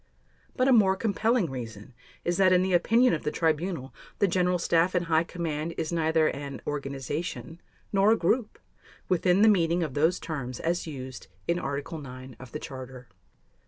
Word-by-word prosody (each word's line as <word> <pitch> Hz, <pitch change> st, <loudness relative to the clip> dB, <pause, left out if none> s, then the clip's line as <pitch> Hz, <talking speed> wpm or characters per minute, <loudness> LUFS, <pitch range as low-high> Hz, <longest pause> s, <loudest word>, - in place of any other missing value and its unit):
But 255 Hz, 0 st, +2 dB
a 265 Hz, -, +6 dB
more 195 Hz, -5 st, +5 dB
compelling 220 Hz, -, +1 dB
reason 115 Hz, -3 st, -7 dB, 0.3 s
is 175 Hz, 0 st, 0 dB
that 190 Hz, -1 st, +5 dB
in 180 Hz, 0 st, +4 dB
the 190 Hz, 0 st, 0 dB
opinion 230 Hz, +8 st, +4 dB
of 160 Hz, -, -1 dB
the -, -, -1 dB
Tribunal 160 Hz, -2 st, -1 dB, 0.2 s
the 200 Hz, -, +3 dB
General 180 Hz, 0 st, +2 dB
Staff 170 Hz, +1 st, +2 dB
and 175 Hz, -1 st, +1 dB
High 160 Hz, 0 st, +3 dB
Command 165 Hz, -2 st, -4 dB
is 160 Hz, 0 st, -2 dB
neither 160 Hz, -1 st, +2 dB
an 140 Hz, 0 st, -6 dB
"organization" 145 Hz, +4 st, -4 dB, 0.3 s
nor 195 Hz, +2 st, +5 dB
a 225 Hz, -, +4 dB
"group" 220 Hz, +5 st, 0 dB, 0.5 s
within 180 Hz, +2 st, +3 dB
the -, -, +7 dB
meaning 175 Hz, -4 st, +3 dB
of 150 Hz, -5 st, -4 dB
those 160 Hz, +6 st, +2 dB
terms 130 Hz, -6 st, -5 dB
as 170 Hz, +1 st, -1 dB
used 130 Hz, -4 st, -7 dB, 0.2 s
in 170 Hz, +1 st, +1 dB
Article 140 Hz, +3 st, -4 dB
9 130 Hz, -2 st, -10 dB
of 130 Hz, -2 st, -11 dB
the -, -, -4 dB
Charter. 130 Hz, -4 st, -9 dB
165 Hz, 175 wpm, -27 LUFS, 140-185 Hz, 0.5 s, the